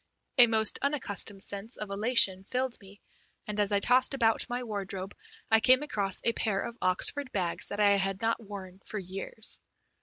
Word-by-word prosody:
A 240 Hz, -, +9 dB
most 220 Hz, -1 st, +2 dB
unaccustomed 205 Hz, -8 st, -1 dB
sense 200 Hz, +4 st, -6 dB
of 210 Hz, -2 st, -6 dB
elation 200 Hz, -3 st, +3 dB
filled 255 Hz, +1 st, -2 dB
me, 200 Hz, +1 st, -16 dB, 0.5 s
and, 210 Hz, 0 st, -4 dB
as 205 Hz, 0 st, +2 dB
I 200 Hz, -, +3 dB
tossed 250 Hz, +5 st, +3 dB
about 225 Hz, -4 st, +1 dB
my 245 Hz, +1 st, -3 dB
wardrobe, 195 Hz, -3 st, -5 dB, 0.4 s
I 220 Hz, -, +6 dB
came 255 Hz, +4 st, +5 dB
across 200 Hz, -9 st, -2 dB
a 230 Hz, -, +1 dB
pair 210 Hz, -4 st, -1 dB
of 235 Hz, -, -5 dB
Oxford 255 Hz, +9 st, +2 dB
bags 180 Hz, -4 st, 0 dB
that 205 Hz, -, -4 dB
I 205 Hz, -1 st, +5 dB
had 195 Hz, -1 st, 0 dB
not 230 Hz, +1 st, -1 dB
worn 195 Hz, -2 st, -10 dB
for 215 Hz, -, -6 dB
years. 195 Hz, +3 st, -3 dB
210 Hz, 180 wpm, -29 LUFS, 195-235 Hz, 0.5 s, A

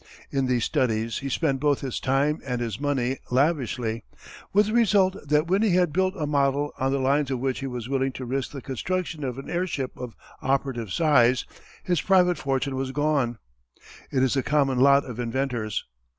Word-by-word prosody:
In 135 Hz, -2 st, 0 dB
these 125 Hz, -3 st, +1 dB
studies 115 Hz, -6 st, 0 dB
he 135 Hz, -, -4 dB
spent 135 Hz, 0 st, 0 dB
both 145 Hz, -1 st, +1 dB
his 130 Hz, -3 st, -3 dB
time 140 Hz, +3 st, +1 dB
and 125 Hz, -2 st, -3 dB
his 115 Hz, -3 st, -3 dB
money 135 Hz, -3 st, -1 dB
lavishly, 125 Hz, -5 st, 0 dB, 0.5 s
with 205 Hz, +2 st, +4 dB
the 215 Hz, -, -3 dB
result 200 Hz, -5 st, +3 dB
that 150 Hz, +2 st, +3 dB
when 190 Hz, +4 st, +1 dB
he 210 Hz, -5 st, +3 dB
had 180 Hz, -4 st, +2 dB
built 185 Hz, +2 st, +1 dB
a 155 Hz, -, -1 dB
model 145 Hz, 0 st, +1 dB
on 135 Hz, +1 st, +1 dB
the 140 Hz, -, +1 dB
lines 140 Hz, +1 st, +1 dB
of 130 Hz, -, -1 dB
which 130 Hz, 0 st, -1 dB
he 135 Hz, -, -4 dB
was 125 Hz, -3 st, -5 dB
willing 135 Hz, 0 st, 0 dB
to 130 Hz, -, -6 dB
risk 130 Hz, +1 st, -2 dB
the 140 Hz, -4 st, -8 dB
construction 165 Hz, +3 st, -3 dB
of 125 Hz, -2 st, -3 dB
an 135 Hz, -, -8 dB
airship 170 Hz, -7 st, -2 dB
of 125 Hz, -2 st, -7 dB, 0.3 s
operative 130 Hz, -5 st, -1 dB
size, 130 Hz, -, +3 dB, 0.4 s
his 175 Hz, -4 st, 0 dB
private 180 Hz, -2 st, +3 dB
fortune 135 Hz, 0 st, -1 dB
was 130 Hz, 0 st, -2 dB
gone. 140 Hz, -5 st, 0 dB, 0.7 s
It 130 Hz, -1 st, +2 dB
is 130 Hz, -, +2 dB
the 135 Hz, -, +1 dB
common 135 Hz, -2 st, +1 dB
lot 140 Hz, +1 st, +5 dB
of 125 Hz, -2 st, -7 dB
inventors. 120 Hz, -3 st, -2 dB
135 Hz, 195 wpm, -25 LUFS, 125-150 Hz, 0.7 s, lot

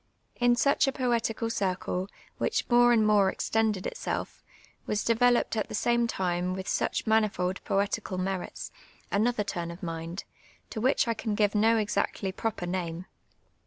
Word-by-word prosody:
In 245 Hz, 0 st, +4 dB
such 280 Hz, +4 st, +3 dB
a -, -, +2 dB
i)oetical 230 Hz, -3 st, -1 dB
circle, 185 Hz, -2 st, -1 dB, 0.3 s
which -, -, 0 dB
more 240 Hz, 0 st, +6 dB
and 220 Hz, -2 st, +4 dB
more 205 Hz, -2 st, +4 dB
extended 215 Hz, -2 st, 0 dB
itself, -, -, -4 dB, 0.5 s
Mas 210 Hz, 0 st, 0 dB
developed 240 Hz, +1 st, +3 dB
at 215 Hz, -, -1 dB
the -, -, -4 dB
same 235 Hz, +1 st, +2 dB
time 180 Hz, -3 st, -1 dB
with 190 Hz, 0 st, -6 dB
such -, -, -1 dB
manifold 205 Hz, -4 st, +1 dB
poetical 200 Hz, -1 st, -1 dB
merits, 185 Hz, 0 st, -4 dB, 0.4 s
another 215 Hz, +2 st, +1 dB
turn 175 Hz, -4 st, -4 dB
of 170 Hz, +4 st, -9 dB
mind, 165 Hz, +2 st, -5 dB, 0.5 s
to 220 Hz, -, -4 dB
which 260 Hz, +1 st, +2 dB
I 230 Hz, -, +2 dB
can 220 Hz, -1 st, -3 dB
give 205 Hz, -1 st, +2 dB
no 220 Hz, +2 st, +4 dB
exactly 205 Hz, -2 st, -1 dB
proper 205 Hz, -2 st, -3 dB
name. 175 Hz, -1 st, -3 dB
210 Hz, 155 wpm, -28 LUFS, 185-230 Hz, 0.5 s, more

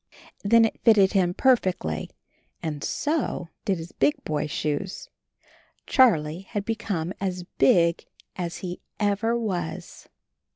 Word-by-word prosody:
Then 225 Hz, +3 st, +6 dB
it 225 Hz, -, -3 dB
fitted 205 Hz, -4 st, +5 dB
him 180 Hz, -3 st, +2 dB
perfectly, 185 Hz, -, +1 dB, 0.5 s
and 150 Hz, -3 st, -4 dB
so 290 Hz, -, -1 dB, 0.2 s
did 195 Hz, -2 st, +1 dB
his 165 Hz, +1 st, -8 dB
big 140 Hz, +2 st, +2 dB
boy 150 Hz, -1 st, -2 dB
shoes. 170 Hz, -, -3 dB, 0.8 s
Charlie 170 Hz, -, +3 dB
had 205 Hz, -1 st, -3 dB
be 225 Hz, -, 0 dB
come 190 Hz, -6 st, -3 dB
as 185 Hz, -2 st, -2 dB, 0.2 s
big 170 Hz, +4 st, +4 dB, 0.3 s
as 170 Hz, -2 st, -4 dB
he 180 Hz, 0 st, -6 dB, 0.2 s
ever 210 Hz, +3 st, +1 dB
was. 180 Hz, -8 st, -4 dB
185 Hz, 125 wpm, -25 LUFS, 160-220 Hz, 0.8 s, Then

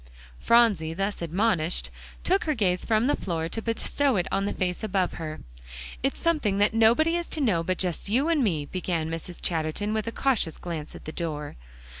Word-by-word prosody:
Phronsie, 205 Hz, -9 st, +3 dB
thus 195 Hz, +1 st, -2 dB
admonished, 175 Hz, -1 st, +1 dB, 0.3 s
took 380 Hz, +2 st, +2 dB
her 305 Hz, -2 st, +1 dB
gaze 185 Hz, -5 st, +2 dB
from 220 Hz, 0 st, +2 dB
the 285 Hz, -, +3 dB
floor, 165 Hz, -3 st, -2 dB
to 225 Hz, -, -4 dB
bestow 240 Hz, +4 st, 0 dB
it 180 Hz, -3 st, 0 dB
on 195 Hz, 0 st, +1 dB
the 205 Hz, -, -1 dB
face 180 Hz, 0 st, -2 dB
above 190 Hz, -3 st, +1 dB
her. 155 Hz, -1 st, -5 dB, 0.6 s
"It's -, -, -1 dB
something 295 Hz, -13 st, +1 dB
that 205 Hz, +2 st, +3 dB
nobody 235 Hz, +10 st, +4 dB
is 345 Hz, -1 st, -2 dB
to -, -, -4 dB
know 210 Hz, -, +2 dB
but 185 Hz, +2 st, -1 dB
just 180 Hz, +1 st, -2 dB
you 260 Hz, +8 st, +2 dB
and 325 Hz, -5 st, +2 dB
me," 160 Hz, -9 st, 0 dB
began 165 Hz, -1 st, -2 dB
Mrs. 165 Hz, +2 st, -6 dB
Chatterton, 165 Hz, +5 st, -1 dB
with 220 Hz, 0 st, -1 dB
a -, -, -1 dB
cautious 235 Hz, -, 0 dB
glance 165 Hz, -4 st, -6 dB
at -, -, -11 dB
the 155 Hz, -, -5 dB
door. 150 Hz, -3 st, -4 dB
195 Hz, 195 wpm, -26 LUFS, 165-230 Hz, 0.6 s, nobody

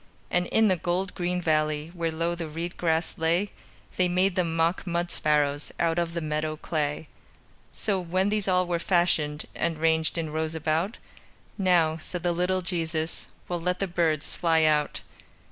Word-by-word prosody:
And 180 Hz, 0 st, +2 dB
in 220 Hz, 0 st, +4 dB
the 190 Hz, -, +4 dB
gold 180 Hz, +3 st, -1 dB
green 180 Hz, 0 st, -1 dB
valley, 155 Hz, 0 st, +1 dB
Where 165 Hz, -2 st, -1 dB
low 165 Hz, +2 st, 0 dB
the 170 Hz, -1 st, -4 dB
reed 165 Hz, +3 st, -5 dB
grass 165 Hz, -1 st, 0 dB
lay, 170 Hz, +5 st, +1 dB, 0.5 s
They 185 Hz, -, +3 dB
made 185 Hz, +2 st, +2 dB
them 170 Hz, -3 st, 0 dB
mock 165 Hz, +3 st, +1 dB
mud 175 Hz, 0 st, -1 dB
sparrows 145 Hz, -1 st, +1 dB
Out 165 Hz, 0 st, +2 dB
of 170 Hz, 0 st, -2 dB
the 170 Hz, -, -1 dB
meadow 155 Hz, 0 st, -2 dB
clay. 150 Hz, -1 st, -2 dB, 0.6 s
So, 200 Hz, -3 st, -1 dB
when 185 Hz, +3 st, 0 dB
these 210 Hz, -1 st, 0 dB
all 185 Hz, -1 st, +3 dB
were 175 Hz, -1 st, -1 dB
fashioned, 165 Hz, -4 st, +1 dB
And 170 Hz, -2 st, -1 dB
ranged 160 Hz, +1 st, +2 dB
in 160 Hz, -2 st, -2 dB
rows 160 Hz, +1 st, -2 dB
about, 160 Hz, +6 st, 0 dB, 0.6 s
"Now," 175 Hz, -5 st, +3 dB
said 175 Hz, +2 st, -6 dB
the 175 Hz, -, +2 dB
little 180 Hz, +2 st, 0 dB
Jesus, 165 Hz, -2 st, -2 dB, 0.2 s
"We'll 175 Hz, -1 st, -2 dB
let 180 Hz, +1 st, 0 dB
the 195 Hz, -, 0 dB
birds 165 Hz, -4 st, 0 dB
fly 165 Hz, -2 st, +3 dB
out." 150 Hz, -1 st, +2 dB
170 Hz, 175 wpm, -27 LUFS, 160-180 Hz, 0.6 s, in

